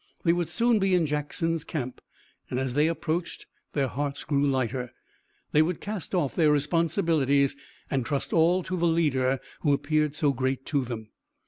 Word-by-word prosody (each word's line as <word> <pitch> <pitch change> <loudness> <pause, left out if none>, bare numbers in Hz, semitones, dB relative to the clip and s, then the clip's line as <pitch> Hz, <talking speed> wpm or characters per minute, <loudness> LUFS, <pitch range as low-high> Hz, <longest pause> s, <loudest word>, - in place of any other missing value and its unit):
They 170 - +4
would 175 -1 -1
soon 235 -1 +2
be 195 -1 +3
in 175 -2 +3
Jackson's 150 +2 -1
camp, 130 -6 -5 0.5
and 125 - -1
as 130 -2 -2
they 150 +3 +3
approached 165 +1 -2 0.3
their 140 -2 +1
hearts 140 +2 -3
grew 140 -2 +1
lighter. 130 -2 -1 0.6
They 150 - +5
would 165 +1 0
cast 205 -3 -4
off 145 -7 +1
their 160 -3 +4
responsibilities 150 -2 +2 0.3
and 135 -2 0
trust 140 +2 -2
all 175 +3 +4
to 185 - -3
the 170 -1 +1
leader 135 -6 +2 0.2
who 145 -3 +2
appeared 150 +1 +1
so 150 -3 +2
great 130 +1 -1
to 140 -3 0
them. 115 -3 -6
150 Hz, 175 wpm, -27 LUFS, 135-165 Hz, 0.6 s, They